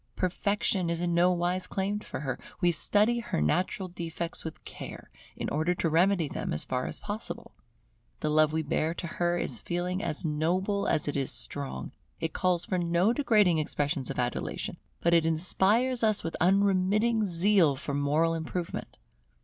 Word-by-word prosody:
Perfection 185 -1 0
is 170 0 -1
in 175 0 0
no 175 +2 +4
wise 180 +1 0
claimed 200 +2 -2
for - - -6
her; 130 -3 -3 0.2
we 175 - +3
study 210 +8 +3
her 230 - -2
natural 180 - 0
defects 170 -1 -5
with 160 - -8
care - - -9 0.2
in - - -4
order 160 +4 +1
to 165 - 0
remedy 175 0 +3
them - - -3
as 75 - -2
far 125 0 -2
as - - -5
possible. 210 +1 -6 0.7
The 155 - 0
love 155 0 +4
we 160 0 0
bear 160 +2 0
to 175 - -5
her 175 +1 0
is - - -3
a - - -20
feeling 180 +2 -2
as 160 -2 -3
noble 180 +6 0
as 150 - +1
it 145 - -2
is 140 -1 0
strong; 115 - -1 0.3
it 165 -1 -3
calls 180 -2 +1
for 185 - -1
no 175 +5 +2
degrading 210 - +3
expressions 145 -2 -1
of - - -4
adulation, 125 -1 -2 0.2
but 170 - +3
it 165 -1 +5
inspires 195 +10 +2
us 215 -2 +3
with 165 - -3
unremitting 200 +4 +3
zeal 175 -3 +3
for 140 +1 -5
moral 150 +4 +2
improvement. 165 +2 -4
175 Hz, 175 wpm, -29 LUFS, 155-190 Hz, 0.7 s, it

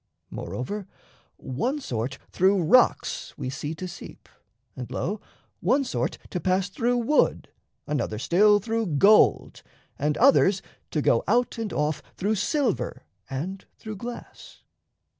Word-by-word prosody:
Moreover, 195 +10 -5 0.5
One 245 - -2
sort 125 - -3
through 190 0 +3
rocks 250 +10 +2
we 130 -3 -4
see 145 +3 -4
to 185 +3 -6
seep, 175 - -11 0.5
and, 125 -2 -7
lo, 205 +4 -3 0.4
One 275 +1 +2
sort 255 - -2
to 180 - -2
pass 185 +1 +1
through 240 +5 0
wood, 240 +6 +2 0.4
another 140 -7 -2
still 205 - +4
Through 225 +1 -2
gold, 210 +8 +4 0.4
and 150 +1 0
others 215 -7 +4 0.3
to 150 - -1
go 115 - +3
out 240 +2 +1
and 225 -2 -3
off 150 0 -1 0.2
Through 205 +4 0
silver 245 - -1 0.3
and 175 +9 -4
through 215 -2 -7
glass. 240 +4 -9
195 Hz, 130 wpm, -25 LUFS, 150-225 Hz, 0.5 s, still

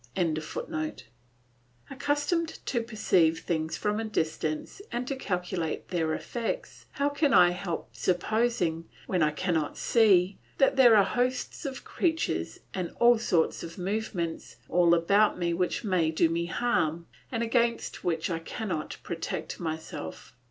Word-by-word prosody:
] 120 - -15 1.7
Accustomed 290 +5 0 0.2
to 240 - 0
perceive 185 -8 +2
things 160 -2 -2
from 210 +1 -1
a - - -1
distance 160 - -2
and 245 +1 -2
to 275 - -1
calculate 180 -8 -3
their 160 -3 0
effects, 235 -2 -4
how 280 0 +1
can 285 -2 +2
I 175 -1 +7
help 175 -2 -5
supposing, 180 -3 0 0.2
when 180 -2 0
I 155 - +4
cannot 160 0 -1
see, 195 -5 +4 0.2
that 270 - +4
there 245 -4 +7
are 205 - +7
hosts 250 - -1
of 265 -1 -6
creatures 325 -2 -1
and 180 -3 -4
all 240 -1 +6
sorts 170 -7 +1
of 165 +2 -8
movements 185 -3 -3
all 170 -1 +5
about 200 +5 +3
me 170 -1 0
which 180 +5 -1
may 180 -6 +2
do 160 +1 +2
me 170 +1 -1
harm, 170 -7 0 0.3
and 230 -2 -1
against 235 0 0
which 165 0 -1
I 165 - -1
cannot 170 -1 -4
protect 165 -1 -4
myself? 160 -1 -6
185 Hz, 140 wpm, -28 LUFS, 165-235 Hz, 1.7 s, I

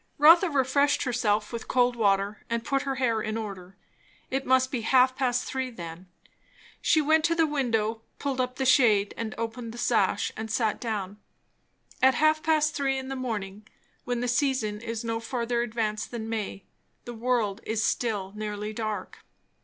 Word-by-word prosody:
Rotha 335 +5 +7
refreshed 280 0 +2
herself 220 -4 0
with 230 - -5
cold 245 -1 +2
water 200 -2 +1
and 235 0 -1
put 275 -2 +1
her 275 -1 -2
hair 235 -4 +1
in 215 +1 -3
order. 195 -4 -7 0.6
It 270 +1 -2
must 260 0 +3
be 250 - -2
half 255 +2 +4
past 250 -2 0
three 260 -1 -3
then. 175 -4 -9 0.7
She 315 - +4
went 315 +1 +3
to 335 0 +2
the 330 -1 +4
window, 230 -7 0 0.2
pulled 270 -2 -1
up 250 0 -3
the 265 - -2
shade 220 -6 +4
and 225 -1 -5
opened 230 0 -5
the - - -9
sash 205 -4 +1
and 220 0 -5
sat 220 -1 0
down. 210 -3 -4 0.8
At 265 -1 +5
half 310 +3 +3
past 305 -1 +2
three 270 -2 0
in 265 0 -5
the 270 - -3
morning, 210 -5 -5 0.4
when 245 -1 -2
the 245 - -1
season 245 -5 0
is 230 0 -4
no 230 -1 -2
further 235 0 -2
advanced 215 -2 -2
than 225 -2 -5
May, 215 -3 -4 0.4
the 240 - -6
world 230 -4 0
is 220 0 -1
still 205 -5 -1
nearly 210 0 -4
dark. 215 -3 -4
235 Hz, 175 wpm, -27 LUFS, 215-260 Hz, 0.8 s, Rotha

